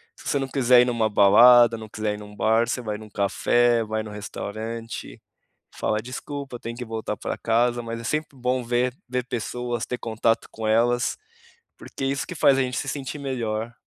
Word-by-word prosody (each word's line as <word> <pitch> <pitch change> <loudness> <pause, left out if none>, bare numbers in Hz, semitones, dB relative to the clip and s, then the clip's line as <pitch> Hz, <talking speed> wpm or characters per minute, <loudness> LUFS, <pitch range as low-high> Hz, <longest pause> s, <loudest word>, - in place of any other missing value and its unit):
Se - - -12
você 145 - +1
não 135 - -2
quiser 125 -2 +5
ir 125 - +2
em - - +1
uma 110 -2 +1
balada, 115 +4 +7
não 110 -1 -9
quiser 110 -1 -2
ir 105 - -7
em - - -8
um 105 0 -12
bar, 110 +2 +2
você 125 - -1
vai 105 -2 -4
em - - -12
um 110 - -11
café, 115 +4 +2
vai 110 0 -3
no 105 - -8
restaurante, 110 +3 -6 0.5
fala: 110 0 0
"Desculpa, 130 +1 -7
tem 115 0 -6
que 125 0 -6
voltar 110 -1 -4
para - - -4
casa", 120 +1 +1
mas 115 0 -5
é - - -8
sempre 155 0 -2
bom 125 0 -1
ver 120 +1 0 0.2
ver 125 -1 -2
pessoas, 120 -1 -3
ter 125 - -4
contato 115 0 0
com 110 -1 -4
elas, 120 +2 +2 0.6
porque 135 - -6
isso 135 +1 -1
que 180 - -7
faz 135 -3 +4
a - - +3
gente 125 -1 -2
se - - -3
sentir 140 +1 -5
melhor. 120 -4 -3
120 Hz, 210 wpm, -24 LUFS, 110-125 Hz, 0.6 s, balada